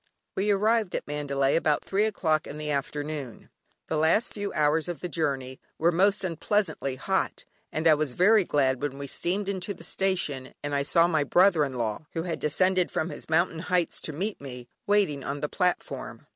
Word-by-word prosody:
We 200 +2 0
arrived 210 0 +2
at - - -3
Mandalay 140 -2 0
about 155 -2 +1
three 200 +2 +1
o'clock 160 -8 0
in 145 - -7
the 150 0 -3
afternoon. 145 -2 -4 0.4
The 160 - -1
last 160 +9 +2
few 205 -1 -4
hours 155 +2 +2
of 175 -2 -4
the 180 - -2
journey 135 -6 -2 0.2
were 170 +2 +3
most 195 +4 +3
unpleasantly 180 -5 -1
hot, 190 +8 -1 0.3
and 160 +1 0
I 160 - +8
was 150 -4 -1
very 210 +3 +5
glad 135 -6 +1
when 145 -2 -3
we 140 - -5
steamed 185 +8 -2
into 200 0 -3
the 170 - -12
station, 165 -8 -1
and 145 0 -3
I 140 - +2
saw 165 +4 +4
my 160 -4 +2
brother 175 +2 +4
in 135 -2 -3
law 115 +4 -3
(who 165 - -2
had 170 -2 -3
descended 185 +4 +2
from 160 - -2
his - - -8
"mountain 165 +1 +2
heights" 180 0 0
to - - -3
meet 195 +6 -3
me) 125 -3 -8 0.2
waiting 195 -10 +2
on 140 +1 -4
the 150 - -1
platform. 180 -2 -2
160 Hz, 195 wpm, -27 LUFS, 145-185 Hz, 0.4 s, I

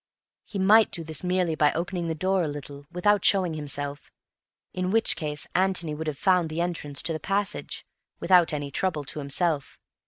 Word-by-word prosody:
He 210 - -7
might 210 +3 +5
do 170 - -4
this 160 0 -3
merely 180 -2 +1
by 150 -1 +3
opening 175 +1 -3
the 160 - -2
door 185 +3 +1
a 165 - 0
little 145 -1 -8
without 200 +3 +2
showing 185 -4 +3
himself, 145 -1 -3 0.6
in 185 0 -2
which 225 +3 +3
case 150 -2 -2
Antony 180 -4 +1
would 155 +1 -5
have 150 -3 -3
found 180 -2 +2
the 155 +2 -4
entrance 165 -5 -2
to 165 - 0
the 155 - -4
passage 200 +5 -1 0.3
without 180 -2 +4
any 145 -2 -4
trouble 175 -5 -1
to 150 - -7
himself. 145 +1 -1
170 Hz, 185 wpm, -26 LUFS, 150-185 Hz, 0.6 s, might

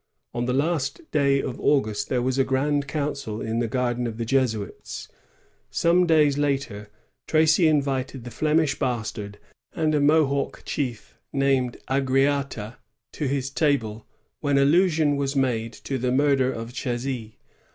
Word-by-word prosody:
On 120 0 -1
the 125 - 0
last 145 - 0
day 140 -2 +2
of 125 - -5
August 110 -8 +1
there 125 -2 0
was 130 +1 0
a - - +5
grand 140 +2 0
council 140 -7 -3
in 115 +1 -2
the 120 - 0
garden 120 0 -1
of 110 -1 -6
the 115 - -2
Jesuits. 115 -5 -2 0.6
Some 175 +1 +3
days 150 -3 +4
later, 135 -8 -2 0.4
Tracy 160 +2 +4
invited 135 -4 0
the 120 - -8
Flemish 155 +4 +1
Bastard 110 -4 -3 0.4
and 155 -1 0
a 150 - +3
Mohawk 145 -2 +2
chief 125 -6 -4
named 135 -3 +1
Agariata 135 -4 0 0.4
to 150 - -2
his 135 0 -2
table, 120 -8 0 0.3
when 145 -2 +1
allusion 155 0 +3
was 140 0 -1
made 120 -4 0
to 135 +3 -5
the 125 +1 0
murder 135 -1 +3
of 115 0 -6
Chasy. 120 -3 -4
135 Hz, 145 wpm, -24 LUFS, 120-145 Hz, 0.6 s, a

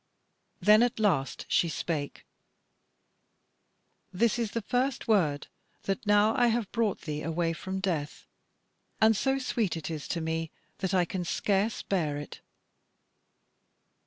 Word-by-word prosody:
Then 210 +1 +6
at 240 -1 +1
last 165 -11 +1
she 170 - +2
spake: 150 -2 -4 1.9
"This 230 +5 +1
is 225 -3 -2
the 230 - -2
first 250 +4 -1
word, 160 -10 +2 0.4
that 195 +3 -3
now 210 +2 +4
I 245 - +4
have 230 -3 0
brought 225 -4 0
thee 150 -3 -4
away 165 +1 -1
from 190 +3 -5
death; 165 -6 -3 0.7
and 220 0 +5
so 270 +5 +1
sweet 230 -9 -1
it 165 +1 -5
is 155 -3 -5
to 170 - -2
me 160 0 -2 0.3
that 190 -1 -1
I 180 -1 +3
can 180 +1 -3
scarce 200 +4 0
bear 155 -7 -1
it." 145 - -8
190 Hz, 135 wpm, -29 LUFS, 165-220 Hz, 1.9 s, Then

